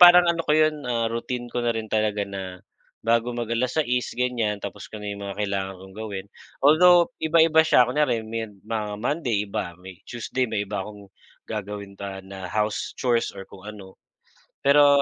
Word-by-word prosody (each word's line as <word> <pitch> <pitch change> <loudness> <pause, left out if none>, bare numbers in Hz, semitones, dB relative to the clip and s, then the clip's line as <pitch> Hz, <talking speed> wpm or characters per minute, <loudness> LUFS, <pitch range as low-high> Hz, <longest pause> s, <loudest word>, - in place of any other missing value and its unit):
parang 175 0 +10
ano 170 -1 +2
ko - - +2
'yon, 155 0 +4
ah, 115 -1 +1
routine 120 +1 -3
ko 120 - 0
na 120 - 0
rin 110 -1 -4
talaga 105 -2 +1
na 95 -2 -7 0.4
bago 115 +1 +2
mag 120 -2 -3
6:00 125 +1 +1
ganiyan, 120 -4 0
tapos 100 0 -7
ko 110 - -8
na 105 -1 -6
'yong 100 - -8
mga 100 0 -5
kailangan 100 -2 -2
kong 95 0 -14
gawin. 100 -3 -5 0.4
Although, 175 - +7
iba-iba 160 0 +5
siya 155 -6 +6
kunyari 125 -3 +1
med 110 -2 -5
mga 105 -2 -3
Monday 120 -3 0
iba, 90 -3 -4
may 90 0 -12
Tuesday 125 +2 -2
may 105 -2 -1
iba 100 0 -3
akong 100 0 -9 0.3
gagawin 105 -2 -5
pa 95 -1 -7
na 95 -1 -7
house 105 +2 -1
chores 120 -3 +1
or 95 - -7
kung 100 +2 -12
ano. 100 -3 -11 0.6
Pero 140 0 +6
110 Hz, 180 wpm, -25 LUFS, 100-125 Hz, 0.6 s, parang